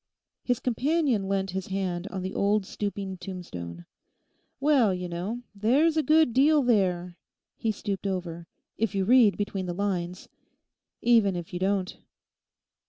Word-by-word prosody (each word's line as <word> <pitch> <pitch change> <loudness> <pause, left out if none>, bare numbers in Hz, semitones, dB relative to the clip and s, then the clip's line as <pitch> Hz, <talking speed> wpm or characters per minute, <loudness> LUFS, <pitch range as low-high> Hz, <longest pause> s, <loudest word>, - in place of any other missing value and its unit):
His 245 -2 0
companion 255 -4 0
leant 195 -1 0
his 190 0 -4
hand 190 -2 -2
on 190 -2 -5
the 190 - -4
old 200 0 +1
stooping 200 -1 -4
tombstone. 90 - -7 0.7
'Well, 270 -9 +3
you 180 0 -4
know, 190 +8 -4
there's 265 +11 +3
a 315 - +3
good 310 -4 +4
deal 290 +3 +4
there'—he 185 -1 -1
stooped 200 -1 -4
over—'if 180 +3 -5
you 195 -1 +1
read 235 -2 +5
between 195 -2 -3
the 175 - -3
lines. 180 -2 -3 0.8
Even 225 -5 +4
if 175 -1 -6
you 175 - -3
don't. 190 0 -1
195 Hz, 135 wpm, -27 LUFS, 180-235 Hz, 0.8 s, read